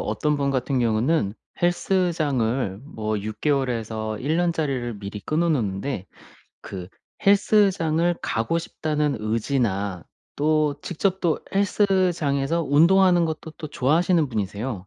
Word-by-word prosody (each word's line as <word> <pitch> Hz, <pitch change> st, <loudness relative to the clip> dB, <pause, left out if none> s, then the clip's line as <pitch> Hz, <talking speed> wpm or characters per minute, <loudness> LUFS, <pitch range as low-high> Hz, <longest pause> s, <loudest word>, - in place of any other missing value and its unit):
어떤 150 Hz, +8 st, 0 dB
분 140 Hz, -1 st, 0 dB
같은 130 Hz, 0 st, 0 dB
경우는 115 Hz, 0 st, +1 dB, 0.3 s
헬스장을 145 Hz, -, 0 dB
뭐 110 Hz, -7 st, -3 dB
6 110 Hz, +1 st, -6 dB
개월에서 115 Hz, -6 st, -1 dB
1 150 Hz, +7 st, -1 dB
년짜리를 140 Hz, -10 st, -1 dB
미리 100 Hz, +1 st, -7 dB
끊어 165 Hz, -, 0 dB
놓는데 105 Hz, -, -1 dB, 0.5 s
그 90 Hz, -2 st, -8 dB, 0.4 s
'헬스장을 190 Hz, -5 st, +3 dB
가고 115 Hz, +9 st, 0 dB
싶다.'는 150 Hz, -3 st, -1 dB
의지나 105 Hz, -, -1 dB, 0.3 s
또 150 Hz, 0 st, +2 dB
직접 190 Hz, +2 st, -1 dB
또 165 Hz, -3 st, +1 dB, 0.2 s
헬스장에서 180 Hz, -7 st, +1 dB
운동하는 175 Hz, +4 st, +5 dB
것도 160 Hz, 0 st, -5 dB
또 155 Hz, -, -8 dB
좋아하시는 155 Hz, +4 st, +2 dB
분이세요. 105 Hz, -1 st, -4 dB
145 Hz, 265 characters per minute, -24 LUFS, 110-170 Hz, 0.5 s, 운동하는